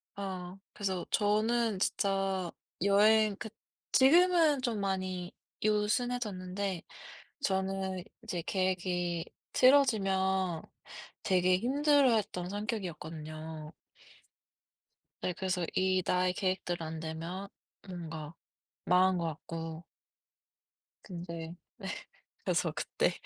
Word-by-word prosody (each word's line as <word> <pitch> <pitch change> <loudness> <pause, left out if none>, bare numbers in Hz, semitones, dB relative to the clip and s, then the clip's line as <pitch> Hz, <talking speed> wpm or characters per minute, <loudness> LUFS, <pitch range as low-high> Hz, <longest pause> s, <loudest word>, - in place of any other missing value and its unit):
아. 190 -2 -5 0.2
그래서 190 -3 -2
저는 215 0 +2
진짜 195 -3 0 0.3
여행 210 +1 +5
그 220 - -6 0.4
지금은 325 0 +6
좀 235 -4 -1
많이 185 -2 -2 0.3
요 210 -1 +3
순해졌는데 200 -6 -1 0.6
저는 190 -2 -1 0.2
이제 180 -7 -3
계획이 180 -2 0 0.3
틀어지면 190 - +4 0.6
되게 185 -1 +3
힘들어했던 250 - +3
성격이었거든요. 160 -6 -5 1.5
네 180 - 0
그래서 185 -1 -1
이 185 0 +3
나의 180 0 +2
계획대로 180 -2 -1
안 160 0 -5
되면 165 +4 -5 0.4
뭔가 165 -4 -6 0.5
망한 185 +1 +4
것 170 - -1
같고 165 +1 -6 1.2
근데 170 -2 -6 0.2
네. - - -7 0.6
그래서 - - +1
그때 - - 0
190 Hz, 200 characters per minute, -32 LUFS, 175-210 Hz, 1.5 s, 지금은